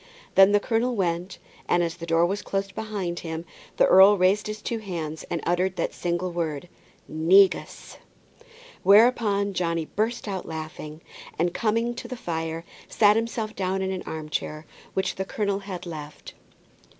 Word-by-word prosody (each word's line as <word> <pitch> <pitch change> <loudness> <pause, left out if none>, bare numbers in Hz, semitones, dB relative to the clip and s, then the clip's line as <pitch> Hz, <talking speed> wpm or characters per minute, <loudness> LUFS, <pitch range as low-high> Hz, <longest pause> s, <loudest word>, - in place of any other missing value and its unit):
Then 195 +1 +7
the 205 - +4
colonel 235 +3 0
went, 180 -1 -2 0.3
and 175 - +3
as 170 +1 -3
the 170 -1 -8
door 165 +1 +3
was 195 +3 -2
closed 195 0 -3
behind 200 -6 -4
him, 165 0 -5 0.3
the - - +5
earl 195 +2 +7
raised 195 +3 +2
his 215 0 -5
two 230 +1 -3
hands 165 -7 -5
and 170 - -3
uttered 180 +2 +1
that - - -2
single 175 +1 -2
word, 165 -2 -3 0.4
"negus!" 185 +5 +2 0.8
Whereupon 205 -2 +4
Johnny 170 -3 -1
burst 220 +6 -2
out 190 -2 -4
laughing, 155 -1 -7 0.4
and 175 +2 0
coming 230 +1 +1
round 240 0 -4
to - - -8
the 255 - -6
fire, 165 -3 -4 0.2
sat 210 -1 +4
himself 225 -1 -2
down 190 0 -1
in 190 - -1
the - - -11
arm 155 -1 -6
chair 155 0 -4 0.3
which 190 - -1
the 190 - -1
colonel 200 0 -2
had 195 -3 -7
left. 150 -3 -8
185 Hz, 165 wpm, -25 LUFS, 170-205 Hz, 0.8 s, Then